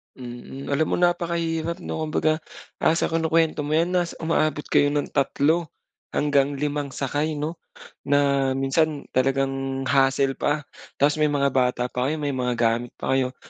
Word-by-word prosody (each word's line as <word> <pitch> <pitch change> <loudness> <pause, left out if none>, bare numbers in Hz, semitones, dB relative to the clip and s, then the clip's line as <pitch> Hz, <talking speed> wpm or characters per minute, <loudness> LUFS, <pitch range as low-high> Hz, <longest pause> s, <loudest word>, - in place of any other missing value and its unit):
Mm, 125 +2 -8
alam 155 +2 +2
mo - - 0
napakahirap 170 -1 0
'no? - - -4
Kumbaga 155 0 +1 0.4
ah, 160 - +3
sa - - 0
kinukuwento 165 -1 +2
mo 155 +1 0
'yan 170 +3 +2
nas 175 -2 0
umaabot 155 -2 +1
kayo 145 - +4
ng 145 - -1
3 150 +4 +1 0.5
hanggang 145 -1 +2
5 145 0 -2
sakay 145 +3 -1
no? 155 +3 -4 0.5
Na 140 -1 +3
minsan 145 +2 +1
talagang 135 0 0
hassle 135 0 +3
pa. 145 0 0 0.3
Tas 145 +2 +2
may 150 - +4
mga 140 -1 +2
bata 125 -1 +1
pa 125 +1 -1
kayo, 155 - 0
may 145 -1 -2
mga 125 -1 -1
gamit 115 +1 +1
pa 130 - -1
kayo. 130 -1 0
145 Hz, 160 wpm, -24 LUFS, 135-160 Hz, 0.5 s, kayo